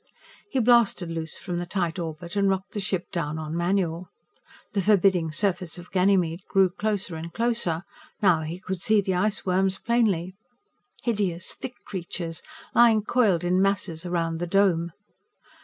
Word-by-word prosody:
He 270 - -2
blasted 235 -7 +3
loose 160 -1 -4
from 175 -1 -4
the 175 - -4
tight 175 -2 -2
orbit 170 +2 -6
and 200 -1 +3
rocked 190 0 -2
the 210 - -3
ship 190 -2 -2
down 155 -3 -2
on 155 0 -5
manual. 175 -1 0 0.6
The 200 - +1
forbidding 190 -5 +3
surface 180 0 0
of 175 0 -11
Ganymede 180 -2 +2
grew 190 -2 +4
closer 205 -3 -2
and 165 +1 -6
closer. 225 -7 0 0.4
Now 180 -6 +4
he 160 +3 -5
could 185 -1 -5
see 215 -1 +4
the 190 -1 -1
iceworms 190 -1 +1
plainly. 205 -7 +1 0.7
Hideous, 195 -7 0
thick 250 - -7
creatures, 170 -3 -5 0.3
lying 225 -3 +5
coiled 210 -8 +2
in 180 +1 +2
masses 190 -4 0
around 165 -2 -1
the 175 - -2
Dome. 175 -3 +2
185 Hz, 155 wpm, -25 LUFS, 170-200 Hz, 0.7 s, lying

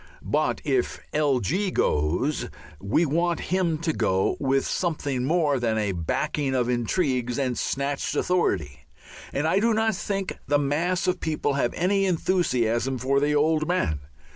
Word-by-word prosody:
But - - 0
if 380 -1 0
"L. 145 -4 +2
G." 190 - 0
goes 90 - 0 0.3
we 105 +12 +2
want 170 +3 0
him 175 -4 +1
to 160 -2 +1
go 95 -7 +1
with 135 -1 +1
something 145 -7 -1
more 150 -3 +2
than 115 -2 0
a 105 -2 0
backing 135 - -1
of 125 -2 +1
intrigues 125 0 0
and 130 -3 0
snatched 140 +3 -2
authority. 95 - 0 0.4
And 145 +3 0
I 180 +4 +3
do 225 +1 +2
not 220 0 +2
think 195 +1 -3
the 145 +1 +3
mass 160 +7 0
of 180 -1 0
people 155 -2 -1
have 135 -3 0
any 195 +2 +2
enthusiasm 135 -9 +1
for 135 +3 +1
the 145 +1 +1
Old 155 +1 +2
Man. 170 - 0
145 Hz, 155 wpm, -25 LUFS, 125-175 Hz, 0.4 s, I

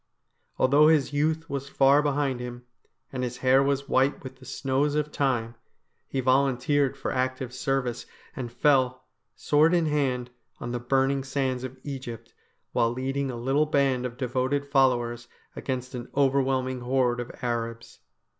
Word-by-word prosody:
Although 145 +4 +5
his 150 -3 +3
youth 160 +2 0
was 140 -1 -4
far 140 +1 +4
behind 145 -3 0
him, 125 0 -7 0.5
and 130 -1 -2
his 125 0 -3
hair 130 +1 +6
was 140 0 0
white 135 +1 +1
with 130 -1 -9
the 130 - -15
snows 140 +3 0
of 150 0 -1
time, 120 -6 0 0.5
he 135 - -2
volunteered 135 +1 +2
for 135 - -3
active 130 -1 -2
service, 130 -2 -2 0.3
and 120 -3 -5
fell, 130 -1 +2 0.3
sword 155 +4 +3
in 170 -2 +2
hand, 130 -5 0 0.3
on 120 - -5
the 120 - -2
burning 135 +2 +1
sands 135 -2 -2
of 130 0 -7
Egypt, 120 -5 -7 0.4
while 115 - +2
leading 135 +2 -2
a 125 - -4
little 135 +6 +1
band 135 -4 +1
of 120 0 -11
devoted 130 +2 -1
followers 120 -3 +2 0.3
against 130 -1 -4
an 125 -1 -6
overwhelming 130 -2 +1
horde 125 -1 +1
of 120 - -5
Arabs. 115 -1 -4
130 Hz, 155 wpm, -26 LUFS, 125-140 Hz, 0.5 s, hair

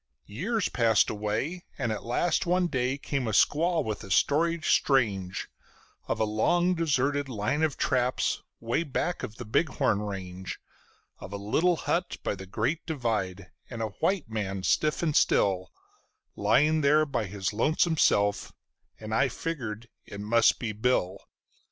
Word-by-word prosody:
Years 195 - -1
passed 115 -3 +3
away, 110 - -3
and 120 -5 -1
at 110 - -4
last 155 +9 0
one 180 +1 +2
day 130 -4 -1
came 140 -3 -3
a 110 - -2
squaw 165 - +3
with 110 -1 -4
a 100 - -10
story 165 - +2
strange, 100 -9 +1 0.6
Of - - -1
a - - +3
long 175 +12 +2
deserted 145 -4 0
line 110 +6 -1
of 155 -3 0
traps 125 0 0 0.2
'way 115 +7 -1
back 170 +3 -2
of 110 - -6
the 120 - -8
Bighorn 110 -3 +1
range; 95 -2 -6 0.6
Of - - -9
a - - -3
little 155 - +1
hut 175 +2 -2
by - - -1
the 95 -1 -9
great 115 - -1
divide, 105 - -2 0.2
and 115 -2 -4
a 110 - -2
white 185 -1 0
man 100 -4 -3
stiff 155 - +1
and 155 -3 0
still, 95 -2 +2 0.6
Lying 155 +4 +3
there 150 +2 +4
by 125 -7 -2
his 95 +1 -3
lonesome 155 +8 +1
self, 100 -6 +2 0.5
and 110 0 -6
I 135 +4 +3
figured 120 -6 -5 0.2
it 100 - -8
must 110 +2 +3
be 115 -3 -3
Bill. 105 -4 0
120 Hz, 155 wpm, -28 LUFS, 105-155 Hz, 0.6 s, there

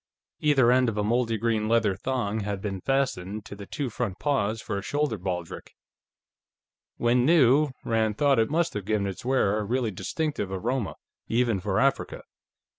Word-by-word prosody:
Either 135 -5 +4
end 125 -1 +4
of 105 - -5
a 105 - +1
moldy 115 +1 +1
green 110 -1 0
leather 115 -4 +2
thong 110 -1 -2
had 100 -1 -3
been 95 -2 -4
fastened 110 -7 -1
to - - -8
the 100 -1 -10
two 145 - -3
front 115 -5 -3
paws 115 -7 0
for 105 -3 -3
a - - -6
shoulder 145 +3 -1
baldric. 90 -3 -5 1.2
When 120 +1 +2
new, 145 -1 +5 0.2
Rand 110 -2 +1
thought, 140 -4 +3
it 110 - +2
must 165 +3 +1
have 105 -2 -4
given 105 -1 0
its 95 -2 -5
wearer 120 -5 +2
a - - -2
really 120 +1 -1
distinctive 145 - -3
aroma, 110 +3 -2 0.3
even 115 -3 +1
for 95 +1 -1
Africa. 135 0 0
115 Hz, 175 wpm, -26 LUFS, 100-130 Hz, 1.2 s, new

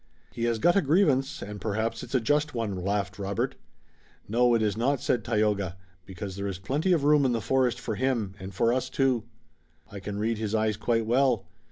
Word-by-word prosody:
"He 120 -1 -2
has 115 -1 +1
got 175 +10 +3
a 200 - +5
grievance, 140 -4 +2
and 105 0 -7
perhaps 110 +2 -2
it's - - -5
a - - +5
just 145 +4 +1
one," 115 -4 -1
laughed 100 +2 -2
Robert. 100 -1 -1 0.7
"No, 120 +2 +3
it 115 - +2
is 105 -2 +1
not," 130 +4 +1
said 120 -2 0
Tayoga, 105 -5 0 0.3
"because 95 0 -6
there 100 +1 -3
is 95 -3 -4
plenty 140 - -1
of 165 -5 +3
room 150 0 +5
in 130 -2 +2
the 115 - 0
forest 130 +2 +1
for 110 - -3
him 115 -4 -1
and 95 +1 -7
for 115 +5 +2
us, 130 0 -1
too. 130 -4 +1 0.7
I 100 - -7
can 100 +1 -5
read 110 +1 -1
his 110 0 -1
eyes 110 -1 +1
quite 115 +2 0
well. 125 -1 +2
115 Hz, 210 wpm, -27 LUFS, 100-130 Hz, 0.7 s, a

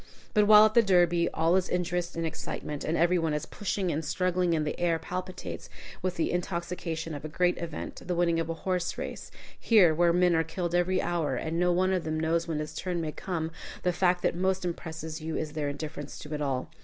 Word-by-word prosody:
But 210 -1 +4
while 210 0 +9
at 215 - +2
the 235 - +7
Derby 175 -4 +3
all 165 +2 +2
is 190 -1 +1
interest 175 0 -1
and 165 0 -1
excitement, 150 -2 -5
and 160 +2 0
every 175 +2 +3
one 160 -2 0
is 150 - -3
pushing 195 -3 -2
and 155 +1 -2
struggling, 180 +2 +1
and 155 -1 0
the 150 - -3
air 170 -2 +2
palpitates 180 +3 -6 0.3
with 185 -1 -1
the 165 - 0
intoxication 170 -2 -3
of 145 - -6
a 155 - -5
great 180 +3 +1
event, 165 -3 -6
the 180 - 0
winning 170 -1 +2
of 165 0 -2
a 165 - -2
horse 180 0 -2
race - - -6 0.3
here, 195 -8 +5
where 170 +2 +4
men 180 0 +3
are 160 - +3
killed 170 +2 -3
every 180 +1 +2
hour 165 -6 0
and 160 +6 -2
no 180 0 +3
one 185 +2 +2
of 180 -2 0
them 155 0 -2
knows 165 +1 +1
when 160 -2 -2
his 150 0 -4
turn 175 +1 -3
may 160 -2 -2
come, 165 -1 -3 0.3
the 180 - +2
fact 180 0 +2
that - - +2
most 185 +1 0
impresses 160 -2 -5
you 160 0 -3
is 155 -1 -3
their 150 -2 -2
indifference 145 0 -6
to 150 0 -8
it 150 - -3
all. 135 -3 -2
170 Hz, 230 wpm, -29 LUFS, 160-180 Hz, 0.3 s, while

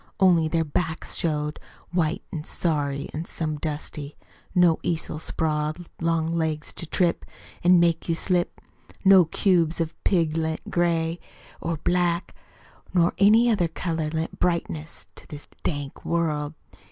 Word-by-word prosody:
Only 175 -4 +5
their 165 0 +1
backs 160 +2 -2
showed 150 -2 -1 0.3
White 170 -2 0
an' 155 -3 -3
sorry 145 -4 -1
an' 160 +2 -4
some 155 -3 -2
dusty. 150 -1 -5 0.4
No 175 -3 +5
easel 160 -2 -2
sprawled 155 +1 -2
long 165 0 +1
legs 160 -2 -1
To 170 - -5
trip 175 +1 +1 0.4
An' 180 0 +6
make 170 0 +2
you 165 - +2
slip. 175 +1 0 0.5
No 190 -2 +8
cubes 170 -1 +2
of 165 -1 -1
pig 165 -5 +2
lent 160 0 -2
gray 170 -1 +1 0.4
Or 165 -1 -2
black, 175 +2 0 0.6
Nor 170 -1 +4
any 220 +4 +6
other 180 -6 +2
color 165 -1 -2
lent 160 +1 -3
brightness 165 -2 -2
To - - -11
this 150 -3 -8 0.2
dank 145 -3 -3
world. 155 -3 -1
165 Hz, 140 wpm, -25 LUFS, 155-175 Hz, 0.6 s, No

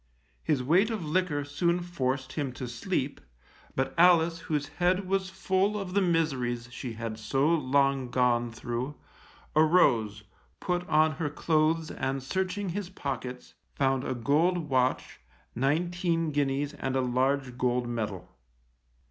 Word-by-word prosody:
His 145 -5 0
weight 180 - +3
of 215 -7 -3
liquor 150 -3 0
soon 170 +5 0
forced 130 -6 -2
him 140 -5 -2
to 125 - -6
sleep, 120 -1 -3 0.5
but 130 - -1
Alice, 170 -1 +5
whose 150 -4 -2
head 185 +2 +2
was 190 0 0
full 190 +2 0
of 185 -2 -5
the 200 - +3
miseries 135 -9 0
she 120 -1 -6
had 115 -1 -5
so 135 +7 +1
long 140 -4 +2
gone 120 -1 +2
through, 120 +5 -4 0.6
arose, 125 - +3 0.4
put 180 0 -2
on 155 +1 +4
her 155 -1 -3
clothes 155 +1 +1
and 135 0 -3
searching 190 +6 -2
his 185 +1 -4
pockets, 130 -7 -5 0.2
found 135 -1 +1
a 130 - -2
gold 155 +7 +1
watch, 130 0 0 0.3
nineteen 165 +4 0
guineas 145 0 0
and 135 -2 -3
a 130 - +2
large 130 +1 0
gold 125 -1 0
medal. 105 -6 -4
145 Hz, 140 wpm, -28 LUFS, 125-175 Hz, 0.6 s, Alice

